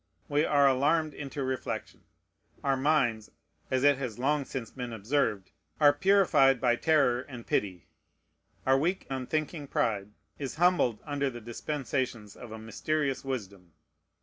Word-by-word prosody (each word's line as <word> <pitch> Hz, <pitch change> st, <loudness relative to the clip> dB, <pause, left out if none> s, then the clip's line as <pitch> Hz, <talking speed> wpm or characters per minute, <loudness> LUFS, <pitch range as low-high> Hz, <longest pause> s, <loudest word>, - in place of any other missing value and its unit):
We 145 Hz, +2 st, +2 dB
are 140 Hz, -2 st, +4 dB
alarmed 150 Hz, +4 st, +2 dB
into 140 Hz, -1 st, -5 dB
reflection; 130 Hz, 0 st, -4 dB, 0.6 s
our 135 Hz, -1 st, +2 dB
minds 130 Hz, -6 st, +1 dB, 0.4 s
(as 130 Hz, 0 st, 0 dB
it 145 Hz, -2 st, +5 dB
has 125 Hz, -6 st, -4 dB
long 140 Hz, +3 st, +1 dB
since 130 Hz, -4 st, -6 dB
been 125 Hz, -2 st, -6 dB
observed) 110 Hz, -3 st, -1 dB, 0.3 s
are 145 Hz, -2 st, +6 dB
purified 145 Hz, -6 st, +4 dB
by 120 Hz, -1 st, +3 dB
terror 135 Hz, -6 st, +3 dB
and 125 Hz, -4 st, -10 dB
pity; 90 Hz, -4 st, -1 dB, 0.8 s
our 135 Hz, 0 st, +4 dB
weak, 175 Hz, +6 st, -1 dB
unthinking 145 Hz, +3 st, -3 dB
pride 105 Hz, -6 st, -1 dB, 0.3 s
is 135 Hz, -3 st, -4 dB
humbled 170 Hz, -9 st, +2 dB
under 140 Hz, -2 st, -1 dB
the 120 Hz, -2 st, -8 dB
dispensations 120 Hz, -2 st, -4 dB
of 120 Hz, -, -11 dB
a 110 Hz, -, -6 dB
mysterious 135 Hz, +5 st, -2 dB
wisdom. 100 Hz, -, -6 dB
135 Hz, 140 wpm, -29 LUFS, 120-145 Hz, 0.8 s, are